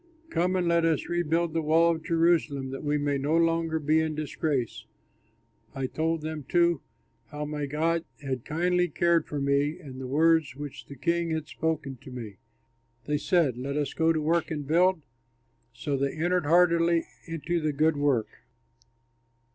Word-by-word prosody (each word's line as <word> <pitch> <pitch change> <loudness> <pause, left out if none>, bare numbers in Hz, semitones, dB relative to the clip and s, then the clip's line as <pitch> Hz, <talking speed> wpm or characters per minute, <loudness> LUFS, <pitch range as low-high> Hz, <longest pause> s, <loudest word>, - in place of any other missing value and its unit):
Come 180 +2 +1
and 180 -2 +1
let 170 0 +3
us 165 -3 +1
rebuild 170 -1 0
the 165 - +1
wall 165 +2 +4
of 160 -1 -3
Jerusalem, 165 -6 +1
that 135 - -6
we 150 0 +1
may 145 -1 0
no 150 +4 +1
longer 165 -1 +1
be 155 +1 +2
in 160 -1 -1
disgrace." 150 -4 -2 0.9
I 135 -1 -2
told 160 +4 -1
them 155 -1 -5
too 170 -3 +3 0.5
how 150 0 -5
my 150 -1 -3
God 165 +3 0 0.2
had 130 -4 -4
kindly 180 +3 +1
cared 170 0 +2
for 145 - -3
me 140 +3 +1
and 135 -7 -10
the 130 - -5
words 160 0 +3
which 145 -1 -8
the 140 - -9
king 170 +5 0
had 160 -2 -2
spoken 155 -5 -3
to 125 - -13
me. 115 -6 -8 0.7
They 150 0 0
said, 150 -4 +2
"Let 140 +3 -3
us 145 -1 -1
go 165 0 +2
to 160 - 0
work 165 +2 +1
and 150 -3 -4
build?" 175 +2 +3 0.7
So 140 +5 -3
they 140 0 -1
entered 175 0 0
heartily 170 0 +4 0.2
into 165 +1 -2
the 155 -1 0
good 155 +2 +2
work. 140 -6 0
155 Hz, 170 wpm, -27 LUFS, 145-165 Hz, 0.9 s, wall